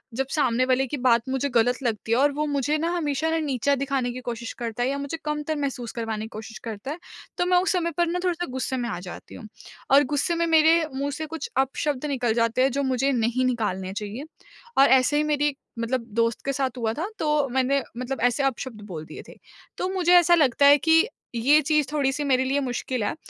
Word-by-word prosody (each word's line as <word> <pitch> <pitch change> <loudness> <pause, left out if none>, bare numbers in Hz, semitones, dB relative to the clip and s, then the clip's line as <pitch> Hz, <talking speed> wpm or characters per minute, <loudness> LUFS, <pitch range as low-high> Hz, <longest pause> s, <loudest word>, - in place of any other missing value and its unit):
जब 265 +2 -1
सामने 255 -5 +2
वाले 260 +1 +1
की 290 - -4
बात 240 -3 +3
मुझे 265 +2 -1
गलत 245 +1 +2
लगती 225 -2 -2
है - - +3
और 285 +1 +4
वो 300 +2 -1
मुझे 290 +1 0
ना 330 +2 0
हमेशा 300 -1 -1
ना 325 - +1
नीचा 280 -2 0
दिखाने 270 -2 -1
की 255 - -7
कोशिश 235 0 -5
करता 235 0 -3
है 255 - +1
या 280 - -2
मुझे 280 +3 -4
कमतर 300 +1 -2
महसूस 270 -5 -3
करवाने 225 -3 -3
की - - -10
कोशिश 220 +1 -8
करता 225 +4 -5
है। 320 - -6 0.4
तो 355 - +1
मैं 360 0 +3
उस - - +1
समय 340 -2 0
पर 345 0 +2
ना 350 +2 -1
थोड़ा-सा 350 -1 -1
गुस्से 260 0 -2
में 240 -1 -2
आ 180 - -4
जाती 180 0 -10
हूँ। 215 - -10 0.4
और 280 +2 +7
गुस्से 315 +4 +1
में 335 - +1
मेरे 320 0 +5
मुँह 280 +2 -2
से 315 +3 -4
कुछ 320 -1 -6
अपशब्द 270 +1 0
निकल 250 -6 0
जाते 230 +2 +1
हैं 270 - +2
जो 280 +3 -1
मुझे 265 +1 +1
नहीं 245 +1 +1
निकालने 190 -6 -2
चाहिए। 210 +5 -5 0.6
और 275 - +8
ऐसे 265 +3 +4
ही 300 - +2
मेरी 295 -1 0 0.2
मतलब 235 +1 -1
दोस्त 230 -1 +1
के 275 - 0
साथ 260 -2 -2
हुआ 225 -2 -1
था 320 +9 -3
तो 300 -2 +1
मैंने 265 +2 +1 0.2
मतलब 255 +2 -4
ऐसे 245 +3 +2
अपशब्द 260 -4 -3
बोल 160 -5 -7
दिए - - -10
थे। - - -12 0.4
तो 365 - -2
मुझे 360 -2 +3
ऐसा 345 0 +5
लगता 280 -3 +3
है 285 +1 +8
कि 325 +6 +4 0.3
ये 280 +7 +4
चीज़ 300 -1 +1
थोड़ी-सी 285 -1 0
मेरे 260 -2 +2
लिए 275 +2 +1
मुश्किल 250 -2 -3
है। - - -2
270 Hz, 230 wpm, -24 LUFS, 240-300 Hz, 0.6 s, और